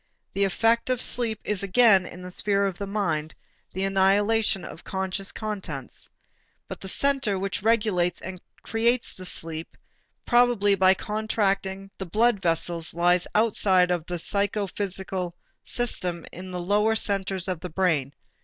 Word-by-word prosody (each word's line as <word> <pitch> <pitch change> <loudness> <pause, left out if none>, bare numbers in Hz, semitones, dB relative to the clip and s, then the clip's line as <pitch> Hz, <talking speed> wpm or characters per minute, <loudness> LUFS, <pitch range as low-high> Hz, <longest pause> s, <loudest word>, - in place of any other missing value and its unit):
The 200 0 +2
effect 225 +5 +2
of 255 -2 +1
sleep 225 -3 +2
is 210 -3 -1
again 200 -2 +4
in 180 +1 -10
the 180 - -7
sphere 200 +1 +1
of 190 -3 -3
the 200 - -4
mind, 165 -7 -2 0.4
the 190 - -3
annihilation 195 +1 +2
of 165 - -10
conscious 190 +1 -2
contents. 190 - -5 0.6
But - - -8
the 190 - -7
center 265 -2 +1
which 195 0 -3
regulates 210 -6 +1
and 185 -1 -8 0.2
creates 235 +2 +1
the 185 - -8
sleep, 165 -2 -2 0.5
probably 240 -4 +4
by 190 0 +5
contracting 195 -2 -1
the 190 - -5
blood 220 +2 +2
vessels, 165 -1 -1
lies 175 +1 +2
outside 195 -4 +3
of 175 -3 0
the 175 - -3
psychophysical 190 -2 -2 0.3
system 180 -8 -2
in 185 +1 -9
the 180 -1 -4
lower 210 +5 +2
centers 195 -3 -2
of 185 -3 -2
the 180 - -6
brain. 160 -6 +1
195 Hz, 145 wpm, -25 LUFS, 180-210 Hz, 0.6 s, by